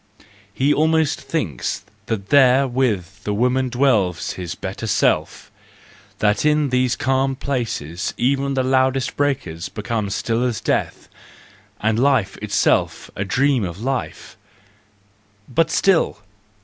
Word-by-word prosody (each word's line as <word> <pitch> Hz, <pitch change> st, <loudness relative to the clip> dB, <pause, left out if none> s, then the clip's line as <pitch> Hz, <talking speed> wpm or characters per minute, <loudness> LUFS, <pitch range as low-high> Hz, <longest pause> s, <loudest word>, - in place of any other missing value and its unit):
He 140 Hz, +3 st, +2 dB
almost 160 Hz, 0 st, +2 dB
thinks 90 Hz, -, -3 dB, 0.2 s
that 100 Hz, -3 st, -3 dB
there 135 Hz, -1 st, +5 dB
with 110 Hz, -6 st, -1 dB
the 105 Hz, -, -2 dB
women 125 Hz, +3 st, +1 dB
dwells 110 Hz, -9 st, +1 dB
his 90 Hz, -2 st, -6 dB
better -, -, -6 dB
self; -, -, 0 dB, 0.7 s
that 105 Hz, -1 st, +1 dB
in 150 Hz, -1 st, +2 dB
these 125 Hz, -1 st, +1 dB
calm 135 Hz, +1 st, 0 dB
places 115 Hz, -, -3 dB
even 135 Hz, +2 st, 0 dB
the 130 Hz, -, +1 dB
loudest 130 Hz, 0 st, +1 dB
breakers 135 Hz, -, -2 dB
become 105 Hz, -1 st, -3 dB
still 115 Hz, +4 st, -1 dB
as 120 Hz, -4 st, -1 dB
death, -, -, -2 dB, 0.7 s
and 110 Hz, +1 st, +1 dB
life 130 Hz, -6 st, +2 dB
itself -, -, 0 dB
a 100 Hz, -, -2 dB
dream 130 Hz, +4 st, +1 dB
of 90 Hz, 0 st, -5 dB
life. 130 Hz, 0 st, -4 dB, 1.1 s
But 165 Hz, +6 st, +1 dB
still! 175 Hz, -, +2 dB
125 Hz, 125 wpm, -21 LUFS, 105-135 Hz, 1.1 s, there